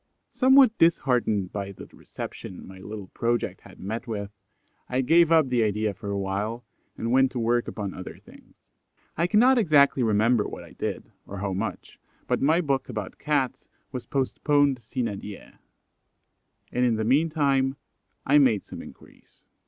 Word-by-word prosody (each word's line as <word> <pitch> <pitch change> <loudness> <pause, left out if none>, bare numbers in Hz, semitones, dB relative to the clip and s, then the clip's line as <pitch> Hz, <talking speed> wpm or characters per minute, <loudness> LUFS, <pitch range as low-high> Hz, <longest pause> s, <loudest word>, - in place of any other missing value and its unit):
'" - - -51
Somewhat 260 -3 +5
disheartened 125 - +2
by 100 -1 -4
the - - -11
reception 95 - -9
my 95 0 -12
little 100 0 -8
project 120 -1 -2
had - - -16
met 115 +6 -5
with, 100 -3 -4 0.6
I 125 +1 +1
gave 165 +5 +4
up 160 -4 +5
the 125 -2 +2
idea 105 -1 0
for 100 +2 -8
awhile, 100 +4 -3 0.3
and 115 - -2
went 130 +1 +4
to 125 - -2
work 120 +1 +1
upon 100 -3 -5
other 95 - -8
things. - - -18 0.6
I 170 +2 +1
cannot 245 +6 +5
exactly 145 - +4
remember 110 0 +2
what - - -8
I - - -14
did, - - -5 0.2
or 100 - -7
how 95 0 -3
much, 100 0 -5 0.3
but - - -1
my 160 +5 +3
book 135 -5 -1
about 105 -5 -6
Cats 140 -4 -1 0.2
was 125 -3 -6
postponed 140 0 +1
sine 115 -3 -3
die, 105 -1 -11 1.1
and 125 - 0
in 120 -2 +3
the 110 - -1
meantime 140 0 +2 0.5
I 145 +2 +5
made 120 -8 +3
some - - -9
inquiries. - - -17
120 Hz, 160 wpm, -26 LUFS, 105-140 Hz, 1.1 s, Somewhat